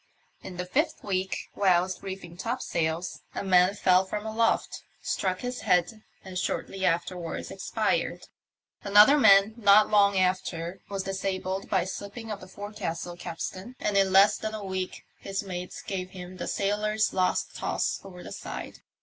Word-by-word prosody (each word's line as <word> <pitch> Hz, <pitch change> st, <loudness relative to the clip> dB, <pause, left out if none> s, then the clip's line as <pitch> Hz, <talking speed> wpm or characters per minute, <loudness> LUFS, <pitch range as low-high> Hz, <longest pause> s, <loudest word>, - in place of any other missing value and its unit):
In 180 Hz, -2 st, -9 dB
the 180 Hz, -, -3 dB
fifth 300 Hz, -, 0 dB
week, 190 Hz, -2 st, -1 dB, 0.2 s
whilst 185 Hz, -1 st, +2 dB
reefing 190 Hz, -3 st, -7 dB
topsails, 175 Hz, -6 st, -2 dB, 0.2 s
a -, -, -2 dB
man 185 Hz, 0 st, +4 dB
fell 185 Hz, -1 st, +4 dB
from 210 Hz, +3 st, -5 dB
aloft, 225 Hz, +1 st, 0 dB, 0.2 s
struck 185 Hz, -1 st, -1 dB
his 250 Hz, 0 st, -4 dB
head 180 Hz, +5 st, +1 dB, 0.2 s
and 185 Hz, -1 st, -4 dB
shortly 190 Hz, +1 st, -3 dB
after 175 Hz, 0 st, +1 dB
wards 170 Hz, -2 st, -5 dB
expired. -, -, -1 dB, 0.6 s
Another 210 Hz, +7 st, +7 dB
man 205 Hz, -5 st, +6 dB
not 210 Hz, -1 st, +6 dB
long 200 Hz, -1 st, +5 dB
after 180 Hz, -1 st, -1 dB
was 195 Hz, -1 st, -3 dB
dis 195 Hz, 0 st, -4 dB
abled 190 Hz, 0 st, -2 dB
by 190 Hz, -, +3 dB
the -, -, -3 dB
slipping 205 Hz, +4 st, -6 dB
of 205 Hz, -, -4 dB
the 185 Hz, -, -10 dB
forecastle 190 Hz, -4 st, -5 dB
capstan, 185 Hz, +6 st, -6 dB
and 210 Hz, -, -1 dB
in 195 Hz, -1 st, +4 dB
less 200 Hz, +2 st, +6 dB
than 220 Hz, 0 st, -3 dB
a 210 Hz, -2 st, -6 dB
week 190 Hz, -1 st, -4 dB
his 195 Hz, +1 st, -4 dB
mates 180 Hz, -2 st, -6 dB
gave 185 Hz, -2 st, -4 dB
him 185 Hz, 0 st, -9 dB
the -, -, -4 dB
sailor's 210 Hz, +2 st, 0 dB
last 185 Hz, -1 st, 0 dB
toss -, -, -1 dB
over 180 Hz, -2 st, -10 dB
the -, -, -9 dB
side. -, -, -7 dB
190 Hz, 165 wpm, -27 LUFS, 180-205 Hz, 0.6 s, Another